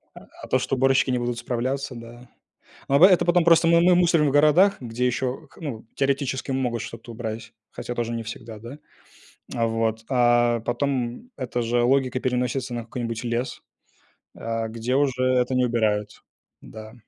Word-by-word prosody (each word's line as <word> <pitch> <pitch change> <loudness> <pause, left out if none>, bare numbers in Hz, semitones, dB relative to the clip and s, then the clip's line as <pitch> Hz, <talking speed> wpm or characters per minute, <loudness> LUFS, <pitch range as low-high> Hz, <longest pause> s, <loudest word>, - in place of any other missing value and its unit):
А, - - -13 0.2
а - - -7
то, - - +2
что - - -2
уборщики 135 0 +3
не 125 - +1
будут 120 0 -3
справляться, 130 +3 -3
да. 120 +1 -12 0.6
Но 140 +5 +5
это 185 -2 +4
потом 175 0 +3
просто 165 0 +5
мы 170 0 +5
мы 180 +1 +5
мусорим 170 -4 +3
в - - +1
городах, 155 +8 +5
где 120 0 -2
ещё, 130 +4 -2
к - - -21
ну, 125 -9 -6
теоретически 135 -1 -1
могут 125 -3 -1
что-то 115 +1 -9
убрать, 115 0 -6 0.2
хотя 120 - -6
тоже 120 -1 -2
не 115 0 -3
всегда, 115 0 -8
да. 120 +7 -10 0.8
Вот, 115 -1 -1
а 120 -2 +3
потом 125 - -2
эта 125 -2 -3
же 120 +1 +1
логика 130 0 +1
переносится 125 0 -2
на 120 - -3
какой-нибудь 115 0 -5
лес, 120 +1 -3 0.7
э, 115 0 -3
где 115 +3 -2
уже 135 -2 +1
это 130 0 +2
не 125 0 +3
убирают, 110 -3 -1 0.4
да. 110 0 -11
125 Hz, 170 wpm, -24 LUFS, 115-135 Hz, 0.8 s, Но